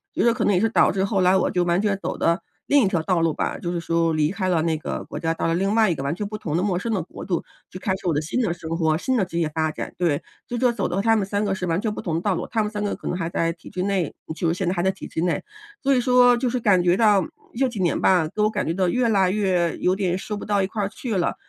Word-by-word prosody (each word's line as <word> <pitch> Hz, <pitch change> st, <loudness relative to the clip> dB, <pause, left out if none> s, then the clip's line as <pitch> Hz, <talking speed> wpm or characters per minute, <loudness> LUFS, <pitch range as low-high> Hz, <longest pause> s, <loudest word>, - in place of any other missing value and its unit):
觉 -, -, +1 dB
得 235 Hz, -, +4 dB
可 230 Hz, -2 st, -1 dB
能 205 Hz, -, +3 dB
也 180 Hz, -, +2 dB
是 225 Hz, -, +2 dB
导 -, -, +4 dB
致 190 Hz, -, 0 dB
后 195 Hz, 0 st, 0 dB
来 185 Hz, +1 st, +4 dB
我 190 Hz, -, +2 dB
就 180 Hz, -, +1 dB
完 175 Hz, +2 st, +2 dB
全 205 Hz, -2 st, +1 dB
走 -, -, -3 dB
的 170 Hz, +2 st, +1 dB, 0.3 s
另 285 Hz, -1 st, +5 dB
一 195 Hz, -, +3 dB
条 175 Hz, -4 st, 0 dB
道 175 Hz, 0 st, +1 dB
路 165 Hz, -1 st, +2 dB
吧。 -, -, -2 dB
就 175 Hz, -, -4 dB
是 175 Hz, -, -2 dB
说 165 Hz, 0 st, +1 dB
离 155 Hz, -1 st, +2 dB
开 190 Hz, 0 st, -2 dB
了 165 Hz, -3 st, +2 dB
那 160 Hz, -1 st, 0 dB
个 155 Hz, -, -4 dB
国 -, -, -7 dB
家， 165 Hz, 0 st, 0 dB
到 165 Hz, -, -2 dB
了 165 Hz, -, +1 dB
另 195 Hz, +3 st, +1 dB
外 220 Hz, -2 st, +4 dB
一 170 Hz, -, +1 dB
个 135 Hz, -, -5 dB
完 140 Hz, +2 st, -1 dB
全 205 Hz, +3 st, -4 dB
不 215 Hz, +1 st, -5 dB
同 160 Hz, -7 st, -3 dB
的 180 Hz, -, 0 dB
陌 195 Hz, -3 st, 0 dB
生 230 Hz, +5 st, -3 dB
的 190 Hz, -, 0 dB
国 160 Hz, -, -9 dB
度， 175 Hz, -4 st, -1 dB, 0.3 s
就 185 Hz, -, -9 dB
开 190 Hz, 0 st, -1 dB
始 190 Hz, -1 st, -6 dB
我 170 Hz, -, +2 dB
的 150 Hz, -, 0 dB
新 160 Hz, +11 st, -2 dB
的 215 Hz, -8 st, 0 dB
生 165 Hz, -2 st, -9 dB
活， 160 Hz, -2 st, +2 dB
新 260 Hz, +9 st, -1 dB
的 200 Hz, -, +2 dB
职 170 Hz, -1 st, -4 dB
业 160 Hz, -2 st, +1 dB
发 155 Hz, 0 st, -1 dB
展， -, -, -6 dB
对。 165 Hz, -5 st, +1 dB, 0.3 s
就 245 Hz, -, -3 dB
说 250 Hz, 0 st, +3 dB
走 225 Hz, -5 st, -2 dB
到 195 Hz, -, -1 dB
她 225 Hz, +2 st, +3 dB
们 210 Hz, -3 st, +1 dB
三 200 Hz, +2 st, -1 dB
个 200 Hz, -, 0 dB
是 180 Hz, -, -3 dB
完 165 Hz, 0 st, 0 dB
全 215 Hz, -2 st, -1 dB
不 -, -, -5 dB
同 165 Hz, -4 st, -2 dB
的 165 Hz, -, -1 dB
道 195 Hz, -1 st, +1 dB
路， -, -, -3 dB
她 225 Hz, -2 st, 0 dB
们 210 Hz, -, -3 dB
三 210 Hz, -1 st, -3 dB
个 205 Hz, -, -1 dB
可 -, -, -9 dB
能 180 Hz, -, -1 dB
还 165 Hz, -, -2 dB
在 165 Hz, -1 st, 0 dB
体 170 Hz, -, -14 dB
制 180 Hz, -, -4 dB
内 190 Hz, -5 st, -1 dB, 0.2 s
就 170 Hz, -, -1 dB
是 -, -, +1 dB
现 185 Hz, 0 st, -2 dB
在 180 Hz, -, +1 dB
还 175 Hz, -, -1 dB
在 190 Hz, -, +3 dB
体 -, -, -9 dB
制 160 Hz, -, -3 dB
内。 170 Hz, -3 st, 0 dB, 0.4 s
所 275 Hz, -1 st, +3 dB
以 250 Hz, -, +3 dB
说 245 Hz, 0 st, +5 dB
就 250 Hz, 0 st, 0 dB
是 250 Hz, -, -1 dB
感 200 Hz, -6 st, +4 dB
觉 175 Hz, 0 st, +4 dB
到 210 Hz, -4 st, +4 dB, 0.3 s
这 265 Hz, +1 st, +3 dB
几 235 Hz, -4 st, -7 dB
年 175 Hz, -, +1 dB
吧， 180 Hz, -4 st, +3 dB
都 210 Hz, +6 st, +1 dB
感 -, -, -2 dB
觉 165 Hz, -, 0 dB
到 185 Hz, -1 st, +1 dB
越 250 Hz, +4 st, +1 dB
来 195 Hz, -4 st, +3 dB
越 185 Hz, -5 st, +1 dB
有 180 Hz, +1 st, +1 dB
点 185 Hz, -2 st, 0 dB
说 210 Hz, +2 st, -5 dB
不 -, -, -7 dB
到 205 Hz, -1 st, +1 dB
一 190 Hz, -, 0 dB
块 210 Hz, 0 st, -3 dB
儿 195 Hz, -, -1 dB
去 225 Hz, +1 st, -4 dB
了， 180 Hz, -, 0 dB
185 Hz, 360 characters per minute, -23 LUFS, 170-210 Hz, 0.4 s, 另